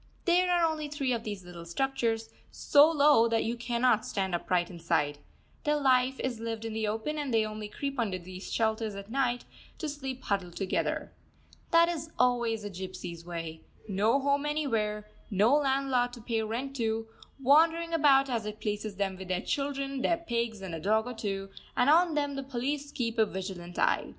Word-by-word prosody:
There 360 0 +4
are 350 -1 +4
only 310 -2 -1
three 280 -3 -1
of 230 -1 -2
these 205 -4 -6
little 175 -1 -9
structures, 225 +3 -1 0.2
so 290 +2 +5
low 290 -7 +5
that 230 -1 +1
you 230 +2 -1
cannot 240 -1 +2
stand 190 -2 -2
upright 175 +1 0
inside. 165 -4 0 0.4
Their 300 -1 +2
life 260 -1 +3
is 250 -3 -2
lived 225 0 -4
in 225 - -4
the 220 -1 -1
open, 225 +9 -2
and 285 -3 -2
they 225 -1 +3
only 215 0 -5
creep 275 +5 -4
under 205 -6 0
these 185 +1 -9
shelters 220 -2 0
at 200 +2 -8
night, 245 -2 0 0.3
to 315 - -3
sleep 270 -3 -5
huddled 190 -4 -2
together. 195 -2 -1 0.6
That 335 0 +6
is 320 -2 -3
always 235 -3 +2
the 205 - -5
gypsies' 180 -2 -7
way: 165 -2 -5 0.3
no 210 +6 +2
home 280 +1 +1
anywhere, 220 -9 -1 0.2
no 210 +4 +4
landlord 265 -3 +1
to 240 - -9
pay 225 0 -1
rent 240 +5 -3
to, 225 -1 -1 0.3
wandering 325 +5 +4
about 280 -4 +5
as 230 -4 -2
it 210 0 -6
pleases 210 -1 -3
them 195 -1 -2
with 190 0 -8
their 185 0 -1
children, 275 -1 -2
their 335 +4 +2
pigs, 235 - -2
and 185 -3 -5
a 165 - -3
dog 215 +6 +2
or 250 - -5
two; 195 -3 -4 0.3
and 265 +4 +5
on 335 0 +4
them 285 -1 0
the 275 - -3
police 275 +2 -3
keep 230 -4 -2
a 220 - +6
vigilant 185 -2 -6
eye. - - +2
230 Hz, 190 wpm, -30 LUFS, 205-275 Hz, 0.6 s, That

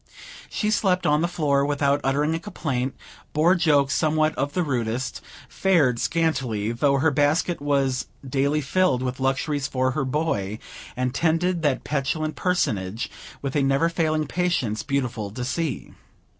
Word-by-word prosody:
She 210 -1 -1
slept 190 -4 +1
on 150 +1 +3
the 170 - +2
floor, 145 -5 +1
without 140 0 +1
uttering 145 +4 +1
a 165 - -1
complaint; 135 -9 -3 0.4
bore 160 +4 +4
jokes 145 -6 +3
somewhat 155 +2 +2
of 145 0 -2
the 180 - +1
rudest; 125 -3 -2 0.3
fared 150 -11 +2
scantily, 130 -10 0
though 140 +4 +2
her 150 +3 +3
basket 145 +4 +1
was 135 -3 0 0.2
daily 140 +3 +1
filled 140 -3 +1
with 125 0 -3
luxuries 135 +2 0
for 130 0 0
her 140 +1 -1
boy; 130 -8 -1 0.4
and 125 0 -1
tended 170 +3 +1
that 145 -4 +1
petulant 155 +2 -1
personage 110 - -1 0.3
with 140 0 -3
a 145 - +3
never 135 +4 +2
failing 155 -2 0
patience 150 -10 -1
beautiful 125 -7 -2
to 125 +5 -5
see. 155 +1 -3
145 Hz, 150 wpm, -24 LUFS, 130-160 Hz, 0.4 s, bore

